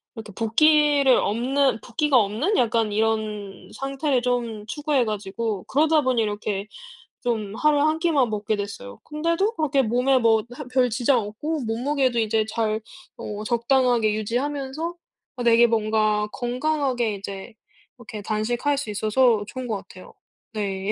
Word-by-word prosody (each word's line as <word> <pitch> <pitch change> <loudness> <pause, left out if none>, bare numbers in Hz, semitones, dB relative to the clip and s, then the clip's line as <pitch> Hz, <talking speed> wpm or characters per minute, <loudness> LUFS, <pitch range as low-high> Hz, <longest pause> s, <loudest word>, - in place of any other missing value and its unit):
이렇게 220 -3 -9
붓기를 285 +4 +4
없는 260 +4 +1
붓기가 270 +3 +1
없는 235 - +1
약간 225 -2 +1
이런 215 -2 -2
상태를 275 -1 -1
좀 235 -4 -2
추구해 290 -1 0
가지고 210 -1 -3
그러다 310 +2 +3
보니 255 -3 +1
이렇게 205 -1 -3 0.5
좀 220 -4 -2
하루에 300 +1 +2
1 310 +1 +2
끼만 295 -8 +2
먹게 215 +1 -1
됐어요. 200 - -7
근데도 335 +8 -1
그렇게 290 -5 +1
몸에 250 +3 +2
뭐 225 -2 +3
하 280 +2 -8
별 255 -1 +3
지장 245 +2 +2
없고 270 +9 -4
몸무게도 250 +1 0
이제 220 0 +1
잘 220 0 -1 0.4
어 210 0 -6
적당하게 235 -1 +2
유지하면서 275 +8 -3 0.4
어 245 - -3
되게 235 0 +6
뭔가 215 -1 +1
건강하게 250 -3 -1
이제 200 +2 -8 0.4
이렇게 220 -3 -8
단식할 235 +7 -1
수 275 -5 -4
있어서 215 +2 +2
좋은 255 +1 -6
것 220 -3 -1
같아요. 185 -1 -13 0.4
네. 200 -1 -2
235 Hz, 305 characters per minute, -24 LUFS, 215-275 Hz, 0.5 s, 되게